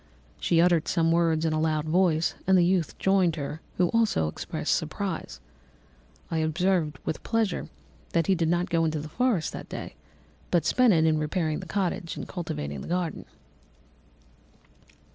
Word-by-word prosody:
She 165 - +2
uttered 170 -2 +3
some 165 -1 +2
words 165 -1 +2
in 160 - +1
a 155 - 0
loud 155 -1 0
voice, 170 0 +2
and 190 0 +5
the 175 - +5
youth 180 -2 0
joined 190 -4 +2
her, 150 +1 -5 0.2
who 180 -1 +3
also 225 - +2
expressed 75 - -2
surprise. - - -3 0.9
I 165 - 0
observed, 160 -1 +1
with - - -3
pleasure, 225 -5 -1 0.4
that 165 -1 +2
he 195 - +3
did 165 -3 +1
not 175 +1 0
go 165 -1 +2
to 155 -1 -3
the 150 - -6
forest 235 -4 0
that - - -8
day, - - -6 0.6
but 170 -3 +2
spent 250 -3 +4
it 160 -2 +3
in 155 -1 +3
repairing 155 0 -1
the 185 - -8
cottage 180 -2 -2
and - - -6
cultivating 155 - -5
the - - -8
garden. 175 -2 -2
165 Hz, 165 wpm, -27 LUFS, 155-180 Hz, 0.9 s, and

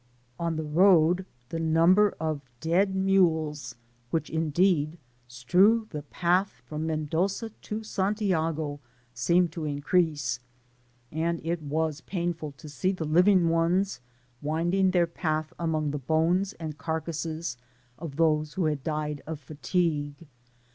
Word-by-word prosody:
On 170 -1 -1
the 160 - -2
road, 175 +2 +4 0.2
the 165 - -3
number 165 +6 +4
of 155 -2 -2 0.2
dead 185 +5 +2
mules, 160 -9 +1 0.3
which 165 - -2
indeed 160 0 +1 0.3
strew 180 - +3
the 150 - -4
path 170 -3 0
from 155 +3 -4
Mendoza 165 +8 -1
to 215 +1 -6
Santiago, 170 -8 -1 0.3
seemed 170 +8 +2
to 160 -1 -5
increase, 145 -3 0 0.7
and 165 +2 -1
it 170 0 -1
was 155 +1 -1
painful 170 -5 -3
to 150 +3 -13
see 150 +6 -1
the 180 -4 -4
living 180 +3 +4
ones 165 -1 +1 0.4
winding 175 +6 +1
their 180 -2 +3
path 155 -2 -2
among 155 -3 0
the 145 - -3
bones 165 +8 +1
• - - -25
and 155 -2 -6
carcasses 160 -3 -3 0.4
of 155 -4 -6
those 155 -1 +2
who 185 -3 0
had 150 -3 -1
died 150 -2 -2
of 160 -2 -4
fatigue. 150 0 -2
160 Hz, 130 wpm, -27 LUFS, 150-180 Hz, 0.7 s, road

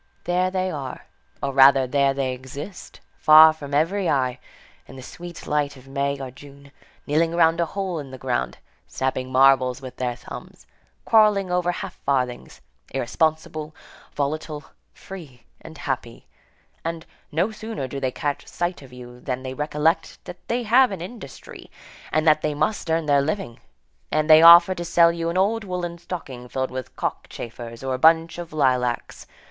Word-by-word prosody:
There 180 +1 +1
they 185 0 -1
are, 135 -5 -6 0.4
or 140 -1 -1
rather, 135 0 +6
there 140 +1 +1
they 135 -2 -1
exist, 140 +8 -9 0.2
far 155 +1 +8
from 145 -3 -10
every 170 +6 +1
eye, 130 -2 0 0.5
in - - -12
the 130 - -10
sweet 175 +4 -10
light 145 -1 -1
of 130 +1 -16
May 140 0 -2
or 130 -2 -6
June, 140 +1 -15 0.3
kneeling 165 +3 +1
round 165 0 +3
a 170 - +1
hole 190 -2 -3
in 140 -2 -8
the 130 - -9
ground, 125 -1 -2 0.3
snapping 130 -1 -3
marbles 130 -1 +4
with 130 -2 -10
their 125 -1 -2
thumbs, - - -11 0.4
quarrelling 210 -4 +4
over 180 0 +1
half - - -7
farthings, 125 -3 -2 0.3
irresponsible, 155 +3 -2 0.4
volatile, 150 +1 -3 0.3
free 155 -11 -12 0.2
and 160 -1 -12
happy; 125 -5 -5 0.6
and, 165 0 -4 0.3
no 170 +8 0
sooner 220 -9 -6
do 140 +2 -6
they 130 -1 0
catch 145 +1 -4
sight 175 -1 -3
of 135 -2 -14
you 125 -1 -12
than 125 0 -4
they 130 0 -5
recollect 150 +4 0
that 175 - -11
they 240 +1 -1
have 245 +3 +4
an 190 -4 -5
industry, 185 - -10 0.4
and 155 +1 +1
that 155 0 +5
they 150 -1 -1
must 175 +3 -1
earn 160 0 +1
their 145 -1 +3
living, 155 - -3 0.5
and 155 0 +1
they 155 0 +8
offer 170 +2 +9
to 175 - -5
sell 170 0 +4
you 165 0 -3
an 170 - -2
old 215 +4 +1
woollen 180 -3 -4
stocking 130 -9 -8
filled 130 +1 -2
with 130 -1 -7
cockchafers, 115 0 -6
or 135 -1 -2
a 130 - -3
bunch 165 +2 +4
of 170 -1 -7
lilacs. 125 -5 -1
150 Hz, 170 wpm, -23 LUFS, 130-170 Hz, 0.6 s, offer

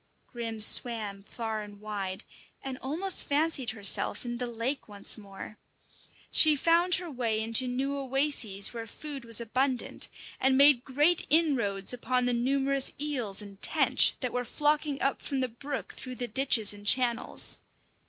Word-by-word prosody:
Grim 230 -2 -7
swam 215 -2 +3
far 220 +1 -6
and 205 -1 -12
wide, 200 -2 -6 0.4
and 265 -1 -7
almost 340 +8 +1
fancied 290 -3 0
herself 205 +2 +1
in 240 0 -5
the 250 - -3
lake 240 +4 -4
once 205 -1 -1
more. 205 0 -12 0.7
She 310 -2 +7
found 335 +4 +3
her 360 -1 -3
way 235 -5 -2
into 230 +3 +5
new 265 +3 -3
oases 270 -7 0
where 230 -1 -7
food 285 +3 -8
was 230 -1 +3
abundant, 255 +3 -2 0.3
and 265 0 +2
made 280 -3 +5
great 295 +6 +2
inroads 250 - +2
upon 250 +1 -1
the 245 - 0
numerous 270 +2 0
eels 250 -9 -2
and 200 -1 -14
tench - - +3
that 250 -3 -4
were 250 - -2
flocking 295 +2 -1
up 275 - -1
from 275 -2 -3
the 255 - -1
brook 275 +5 -7
through 255 -1 -9
the 245 -1 -5
ditches 235 -3 +2
and 205 0 -12
channels. 245 0 +1
250 Hz, 155 wpm, -28 LUFS, 220-275 Hz, 0.7 s, She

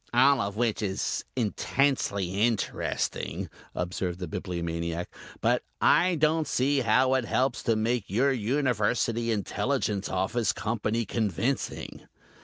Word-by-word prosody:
"All 135 +1 +5
of 100 0 -3
which 115 -1 0
is 95 -3 -1
intensely 105 -5 0
interesting," 115 -2 -1 0.2
observed 90 0 -2
the 90 -1 -5
Bibliomaniac, 85 -1 -3 0.3
"but - - +2 0.2
I 180 0 +4
don't 155 0 +2
see 140 +2 +2
how 130 +2 +3
it 130 -3 +1
helps 130 +2 0
to 115 - +1
make 115 0 0
your 125 +8 +3
University 120 -2 0
Intelligence 105 -1 -1
Office 95 +5 0
Company 115 +1 -1
convincing." 115 - -2
115 Hz, 115 wpm, -28 LUFS, 100-130 Hz, 0.3 s, All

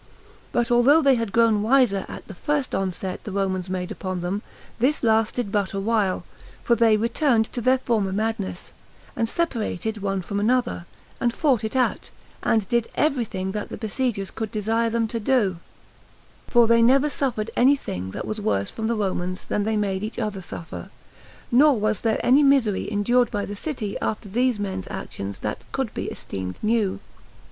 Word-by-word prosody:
But 240 0 0
although 270 +7 +5
they 275 -1 +6
had 230 -4 -1
grown 225 -1 +4
wiser 220 -4 +3
at - - -9
the 200 - -8
first 290 +7 -1
onset 190 -1 -3
the 210 - -6
Romans 190 -2 -1
made 185 -1 -3
upon 185 -1 -4
them, 185 +4 -2 0.4
this 265 +5 +2
lasted 225 -1 +1
but 205 -1 0
a 195 - -2
while; 205 -2 +1 0.4
for 235 - +3
they 225 -2 +4
returned 235 +1 +2
to 245 - -2
their 255 +3 +4
former 220 -6 0
madness, 200 - -3 0.4
and 230 -1 0
separated 220 - -2
one 195 -1 -1
from 200 +3 -3
another, 240 -5 0 0.3
and 240 - +2
fought 265 -8 +2
it 220 +3 -3
out, 255 -1 0 0.3
and 220 -4 +1
did 235 +1 +1
everything 230 -10 0
that 210 +1 -4
the - - -6
besiegers 220 -3 -2
could 220 -1 -4
desire 225 +2 0
them 230 0 0
to 230 +1 -3
do; 210 -6 +2 0.9
for 240 -1 +5
they 230 0 +4
never 265 +5 +5
suffered 245 -7 -2
any 265 +4 +5
thing 95 - -5
that - - -5
was 215 0 -4
worse 100 - 0
from 220 -1 -3
the 235 - +1
Romans 185 -3 -2
than 205 - -1
they 220 0 0
made 195 -2 -1
each 215 +2 -5
other 210 -3 -2
suffer; 160 - -8 0.6
nor 270 0 +5
was 215 -1 0
there 225 -2 +1
any 260 +4 +6
misery 265 -9 +3
endured 240 +4 +2
by 205 -1 -2
the 205 - -6
city 215 -4 -4
after 215 -1 -2
these 245 +3 +1
men's 190 -2 -4
actions 100 0 -6
that - - -4
could - - -2
be - - -4
esteemed 95 -1 -6
new. 215 -3 +1
220 Hz, 180 wpm, -24 LUFS, 195-240 Hz, 0.9 s, they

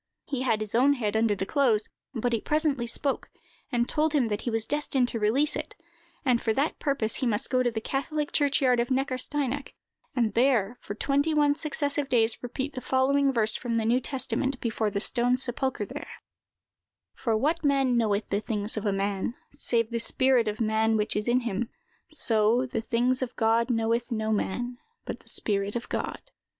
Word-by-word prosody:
He 270 -3 -3
had 225 -4 +1
his 215 -1 -5
own 260 +5 +5
head 220 -6 -2
under 220 -1 +2
the 190 - -3
clothes; 225 -3 +2 0.3
but 240 +1 -1
it 225 - -1
presently 300 -6 0
spoke, 270 +4 -1 0.4
and 240 -1 +1
told 310 0 0
him 260 -6 +2
that 210 0 -2
he - - -2
was 225 -1 -1
destined 285 -3 0
to 230 - -3
release 255 +9 +2
it, - - -5 0.5
and 245 -3 +3
for 220 - +1
that 285 +7 -1
purpose 275 -6 0
he 260 - -1
must 225 +2 +2
go 255 -1 +3
to 245 - +2
the 225 -1 -3
catholic 290 +5 -2
churchyard 275 -4 +3
of 235 - 0
Neckarsteinach, 270 +1 0 0.4
and 230 -5 +1
there, 240 -3 +2
for 205 - -6
twenty 285 +6 +1
one 295 -1 +4
successive 290 -1 -2
days, 230 -2 +2
repeat 260 +4 -4
the 255 - -5
following 275 +2 +2
verse 220 -4 +3
from 235 -2 -2
the 225 -1 +1
New 240 +3 +3
Testament, 265 0 -1
before 225 -2 -1
the 200 0 -2
stone 245 +3 +2
sepulchre 255 -3 -2
there:— - - -9 0.9
"For 225 -3 0
what 320 +8 0
man 275 -3 +2
knoweth 215 -3 +1
the 200 +1 0
things 210 0 -2
of 215 0 -2
a - - +2
man, 195 +3 -1 0.2
save 235 -5 0
the 235 - -1
spirit 255 0 +2
of 210 0 -2
man 220 0 +2
which 210 0 0
is 210 +2 -1
in 245 +1 +3
him? 235 0 -2 0.4
So, 235 -4 +2
the 235 -3 -3
things 245 +3 +1
of 250 -1 -3
God 230 +2 +2
knoweth 230 +1 0
no 220 -1 -1
man, 240 +4 -2 0.3
but - - -5
the - - -16
spirit 200 0 -1
of 240 - -4
God." - - -3
240 Hz, 195 wpm, -27 LUFS, 220-270 Hz, 0.9 s, own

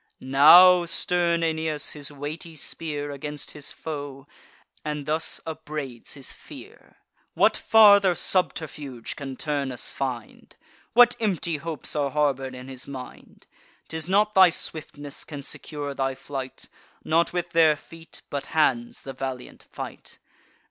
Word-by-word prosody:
Now 170 +7 +7
stern 170 0 0
Aeneas 160 -2 -1
waves - - -2
his 145 -1 -7
weighty 155 +4 -7
spear 145 -1 -4
Against 145 +1 -6
his 150 -2 -7
foe, 145 -3 -7 0.6
and 150 -1 -4
thus 155 +2 0
upbraids 155 -6 -6
his 135 -2 -4
fear: - - -14 0.4
"What - - +4
farther 200 -4 +6
subterfuge 150 -8 -1
can 135 -2 -6
Turnus 140 -4 -3
find? 125 -4 -5 0.4
What 245 0 +7
empty 175 -7 -1
hopes 160 +1 -3
are 145 -2 +1
harbour'd 135 -3 0
in 125 +1 -9
his 130 -1 -7
mind? 130 -2 -10 0.4
'Tis 160 +1 -5
not 210 +2 +3
thy 190 -1 +8
swiftness 145 -3 -5
can 145 -3 -8
secure 145 0 -6
thy 135 -1 -1
flight; 135 -1 -7 0.4
Not 165 +2 +2
with 175 -1 -3
their 160 -2 +5
feet, 165 +2 -12
but 140 -1 -4
hands, 120 -6 +1
the 135 - -7
valiant 130 -1 -7
fight. - - -8
150 Hz, 135 wpm, -25 LUFS, 135-165 Hz, 0.6 s, thy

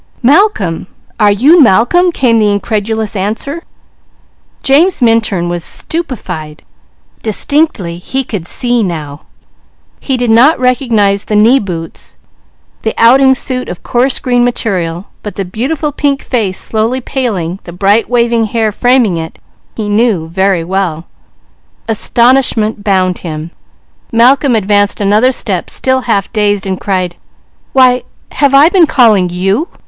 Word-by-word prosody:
"Malcolm! 245 - +2 0.3
Are 210 -2 +4
you 285 - +4
Malcolm?" 280 - +3
came 240 -7 +1
the 210 -1 +2
incredulous 215 +1 -2
answer. 220 - -3 1.0
James 320 +7 +3
Minturn 225 -7 +1
was 175 -1 -2
stupefied. 180 - -5 0.6
Distinctly 215 - -1
he 265 +9 -3
could 200 -8 -6
see 240 +3 -1
now. 155 -7 -5 0.7
He 265 -2 -2
did 245 -2 0
not 255 +8 +4
recognize 230 -6 +1
the 210 - -2
knee 230 +6 +4
boots, 170 -6 -7 0.7
the 220 - -3
outing 265 +3 +5
suit 255 0 -3
of 175 - -8
coarse 255 +2 0
green 245 -1 0
material, 185 -7 -2 0.2
but 210 - -7
the 195 - -3
beautiful 275 - -3
pink 280 -1 -1
face 210 -7 -2
slowly 225 +4 -1
paling, 200 -10 -3
the 175 - -8
bright 200 +5 +1
waving 235 -2 +1
hair 220 0 -1
framing 245 -4 +1
it, 160 0 -6 0.4
he 215 -2 -4
knew 205 -6 0
very 190 0 0
well. 175 -2 -3 0.8
Astonishment 230 -1 +1
bound 185 -3 0
him. 160 -1 -7 0.6
Malcolm 255 +3 +3
advanced 205 -1 +1
another 210 +5 +2
step, 195 -8 -3
still 260 0 0
half 225 -5 -2
dazed, 205 -3 0
and 190 -1 -4
cried: 185 -3 -2 0.6
"Why, 255 -1 +4 0.3
have 280 -2 +1
I 285 +3 +7
been 350 -2 +3
calling 220 - +3
_you? 195 - -1
220 Hz, 135 wpm, -11 LUFS, 190-255 Hz, 1.0 s, I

